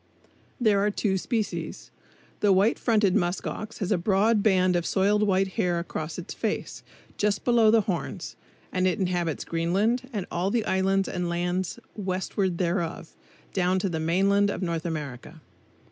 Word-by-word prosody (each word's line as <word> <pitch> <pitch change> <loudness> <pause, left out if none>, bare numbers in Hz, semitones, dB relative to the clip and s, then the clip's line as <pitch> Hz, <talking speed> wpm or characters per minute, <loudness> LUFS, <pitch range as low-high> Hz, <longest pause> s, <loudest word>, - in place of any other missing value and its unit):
There 215 -5 +3
are 205 +1 +2
two 205 -1 0
species. 225 +1 -3 0.5
The 205 - +3
White 195 +4 +3
Fronted 210 -5 +2
Musk 175 +1 0
ox 215 +1 -5
has 195 -1 -3
a 195 - +3
broad 205 +4 +3
band 185 -3 +3
of 175 - +1
soiled 200 +4 +2
white 195 -2 +2
hair 180 -4 0
across 165 -2 -4
its 175 - -6
face, - - -3 0.4
just 205 -1 0
below 235 -3 +5
the 225 0 +5
horns; 190 -2 -4 0.4
and 185 0 +1
it 180 - +1
inhabits 175 -4 -1
Greenland 200 +10 0
and 205 -6 -3
all 180 +3 0
the 225 +1 0
islands 195 0 +1
and 180 -1 -2
lands 175 +2 -1 0.2
westward 190 -2 -1
thereof, 170 -2 -2 0.4
down 185 0 +2
to 190 +1 0
the 160 -2 -2
mainland 195 +5 +2
of 200 - -3
North 170 -1 -2
America. 150 -1 -6
190 Hz, 160 wpm, -26 LUFS, 175-205 Hz, 0.5 s, below